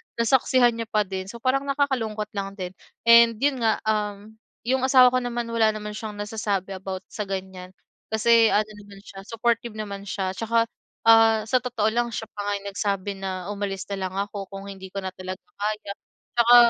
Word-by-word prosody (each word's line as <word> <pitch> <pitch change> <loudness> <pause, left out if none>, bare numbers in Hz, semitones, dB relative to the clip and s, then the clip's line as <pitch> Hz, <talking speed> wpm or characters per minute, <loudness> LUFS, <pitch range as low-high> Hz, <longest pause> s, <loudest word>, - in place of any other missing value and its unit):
nasaksihan 240 0 +3
niya 230 - -3
pa 215 -2 +2
din, 190 -1 -5
so 235 +3 -10
parang 275 +2 +1
nakakalungkot 245 -7 -1
lang 195 -1 -4
din. 185 -2 -5 0.3
And 235 0 +7
'yon 270 +2 +1
nga, 225 -1 +1
um, 210 -1 -2 0.3
yung 260 +2 +1
asawa 255 -2 +7
ko 255 - +2
naman, 240 -1 -3
wala 220 -2 +3
naman 210 0 -5
siyang 215 0 -6
nasasabi 205 -2 -3
about 190 0 -5
sa 210 -2 -4
ganiyan, 190 -1 -6 0.3
kasi 225 +1 +5
ano 215 0 +2
naman 200 -1 -14
siya, 195 0 -11
supportive 230 0 -1
naman 200 -2 -6
siya 190 -1 -2
tsaka, 230 +3 +1 0.4
ah, 225 -1 +6
sa 250 +4 +2
totoo 220 -4 0
lang, 240 +1 +1
siya 225 0 -6
pa 205 -1 -5
nga 205 - +1
yung - - -6
nagsabi 200 0 -1
na 190 0 -4
umalis 200 -2 -3
na 195 -1 -2
lang 185 - -10
ako 200 0 -3
kung 195 0 -8
hindi 190 -1 -9
ko 195 +1 -6
na 190 - -3
talaga 185 0 -7 0.2
kaya. 210 -1 -2 0.5
Tsaka, 235 +1 +7
210 Hz, 190 wpm, -25 LUFS, 195-230 Hz, 0.5 s, And